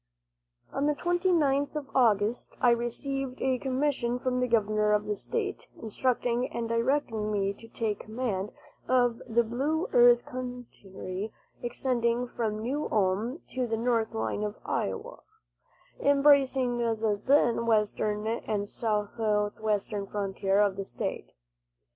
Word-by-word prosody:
On 280 +2 0
the 300 - +2
29th 330 -5 +1
of 290 -2 -6
August 225 -2 +2
I 245 - +5
received 255 +3 -2
a 260 -1 +1
commission 260 -2 0
from 250 0 -1
the 250 - +1
governor 215 -2 +2
of 210 0 +1
the 210 - -1
state, 410 - -3
instructing 245 +2 0
and 235 -1 -3
directing 230 -2 0
me 200 -1 0
to 225 - -14
take 225 -2 -2
command 215 -3 -3 0.4
of 245 -2 +2
the 235 +1 +3
Blue 275 +8 -1
Earth 240 0 +6
country, 220 -6 -6 0.3
extending 240 -1 0
from 220 -3 -3
New 280 +6 -2
Ulm 210 - 0
to 255 -1 -2
the 225 -1 -1
north 230 -1 0
line 110 - -1
of 210 0 -2
Iowa, - - -3 0.8
embracing 275 -3 +4
the 220 -3 0
then 240 -4 +3
western 210 -1 +1
and 215 -2 -2
southwestern 210 -1 -1
frontier 195 0 0
of 200 -2 +2
the 195 - -2
state. 120 - -4
235 Hz, 130 wpm, -29 LUFS, 210-255 Hz, 0.8 s, Earth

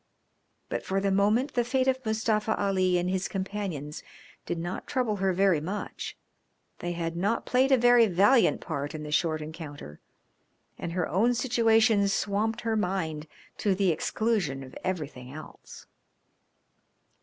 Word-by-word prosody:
But - - -3
for 195 0 -1
the 195 0 0
moment 210 +8 +2
the 245 - +2
fate 260 +2 0
of 260 0 +1
Mustafa 220 -1 0
Ali 185 -2 +2
and 175 0 0
his 185 -1 -1
companions 190 -6 -4 0.5
did - - -2
not 175 +2 -5
trouble 245 -6 0
her 190 0 +1
very 185 -4 +3
much; 195 +6 -5 0.6
they 175 0 -3
had 165 -1 -3
not 200 +7 0
played 260 +2 +2
a 265 - +7
very 245 -1 +6
valiant 200 - +4
part 140 +2 -4
in 155 - -6
the 150 - -6
short 155 0 +1
encounter, 150 - -9 0.8
and 170 - -4
her 180 -2 0
own 230 +7 +2
situation 225 -4 +3
swamped 205 +3 0
her 225 0 -1
mind 165 -7 -2 0.3
to 200 -3 +2
the 190 -2 +2
exclusion 165 -5 -1
of 130 - -12
everything 145 -9 -4
else. 155 +2 -11
195 Hz, 150 wpm, -28 LUFS, 165-220 Hz, 0.8 s, a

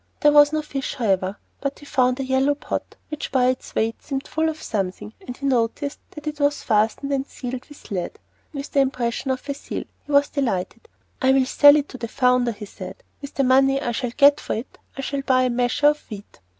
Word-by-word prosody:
There 295 - +6
was 290 0 +7
no 310 0 -1
fish 275 -2 -4
however, 195 -5 0 0.2
but 275 0 -3
he 290 - -14
found 255 -2 +1
a - - -1
yellow 265 +2 +2
pot, - - -5
which 300 -1 -5
by 255 -1 +3
its 255 - -4
weight 225 +1 0
seemed 270 -1 -4
full 320 0 0
of 315 0 -5
something, 210 -1 -3
and 250 - -6
he 280 - -6
noticed 260 +2 0
that 300 -1 -11
it 300 0 -4
was 285 0 +1
fastened 225 +6 +1
and 275 0 -1
sealed 250 0 -6
with 295 - -15
lead, 180 -3 -3 0.3
with 280 -3 -6
the 280 - +2
impression 255 -1 0
of 260 +1 -2
a 280 - -1
seal. 280 - -6 0.2
He - - -6
was 285 0 +4
delighted. 250 - -2 0.3
"I 265 0 +4
will 265 -1 +4
sell 290 +2 +7
it 295 -1 +1
to 255 - -9
the 230 - -4
founder," 250 0 +2
he 210 -1 -8
said; - - -10 0.2
"with 280 - -9
the 275 - +2
money 270 +1 +4
I 240 - -2
shall 245 +1 -2
get 285 +1 +6
for - - -3
it 225 +5 -7 0.2
I - - -3
shall 275 +1 -2
buy 255 -1 +3
a 255 - +1
measure 245 +4 +3
of 300 0 -1
wheat." 205 -2 -10
270 Hz, 230 wpm, -23 LUFS, 245-285 Hz, 0.3 s, was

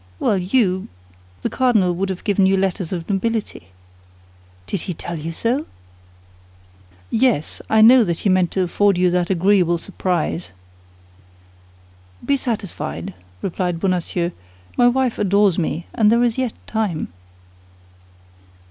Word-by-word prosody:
"Well 200 - +1
you—the 90 - -2
cardinal 220 -9 +2
would 190 +3 -2
have 185 -1 -5
given 200 -2 +2
you 195 0 +3
letters 190 -2 -1
of 170 -3 -4
nobility." 210 - -2 1.0
"Did 180 - -3
he 180 - -5
tell 170 +1 -6
you 160 +2 -5
so?" 240 - -1 1.4
"Yes, 225 - +1
I 220 0 +4
know 240 +3 +8
that 170 -5 -2
he - - 0
meant 185 -2 +3
to 190 - +1
afford 200 +2 +2
you 180 0 +3
that 180 0 0
agreeable 185 -2 +3
surprise." 175 - -3 1.7
"Be 280 - +2
satisfied," 225 -8 -4 0.3
replied 180 -2 -2
Bonacieux; 175 -1 -1 0.4
"my 245 - +5
wife 250 -1 +1
adores 200 -2 +3
me, 165 0 -2
and 215 -3 +3
there 235 +1 +4
is 235 -2 +1
yet 255 -3 -1
time." 210 -8 -2
190 Hz, 130 wpm, -20 LUFS, 175-220 Hz, 1.7 s, know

